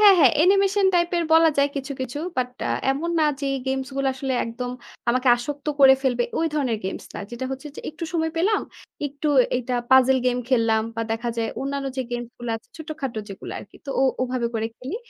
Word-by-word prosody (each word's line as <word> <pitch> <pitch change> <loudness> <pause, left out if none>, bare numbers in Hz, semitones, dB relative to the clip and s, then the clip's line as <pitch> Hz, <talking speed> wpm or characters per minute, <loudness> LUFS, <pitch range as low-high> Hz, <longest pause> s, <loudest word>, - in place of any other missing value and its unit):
হ্যাঁ, 410 -2 +9
হ্যাঁ। 270 -7 +7
অ্যানিমেশন 390 +3 +4
টাইপের 345 0 +2
বলা 325 0 +7
যায় 280 0 +4
কিছু, 280 +1 -3
কিছু। 260 +2 -4 0.2
বাট 250 -1 0 0.2
আ - - 0 0.2
এমন 315 +5 -1
না - - +4 0.2
যে, 280 - -1 0.2
গেমস 265 0 -1
গুলো 275 -1 +1
আসলে 265 0 -3
একদম 245 +2 -4 0.4
আমাকে 255 +1 +1
আসক্ত 285 +4 -6
করে 265 -1 +9
ফেলবে, 245 -2 +1
ওই 325 - +2
ধরনের 255 -7 0
গেমস 190 - -4
না। - - -5
যেটা 240 +2 -5
হচ্ছে 270 +3 -6
যে - - -6
একটু 325 +2 -6
সময় 320 -1 0
পেলাম, 395 +6 +2 0.5
একটু 285 +2 -3 0.3
এইটা 250 0 -2 0.2
পাজল 260 0 +6
গেম 245 - +2
খেললাম 225 -3 +3
বা 230 - 0
দেখা 235 +2 -2
যায় 230 -1 0
অন্যান্য 275 0 -2
যে 260 - 0
গেমস 240 0 -4
গুলা 240 -1 -3
আছে, 225 - -16
ছোটখাটো 295 -7 -5
যেগুলো 195 - -8
আরকি। - - -12
তো 275 - -3
ও - - +4 0.2
ওভাবে 250 -2 -1
করে 225 0 0
খেলি। 265 - -5
265 Hz, 205 wpm, -24 LUFS, 245-310 Hz, 0.5 s, হ্যাঁ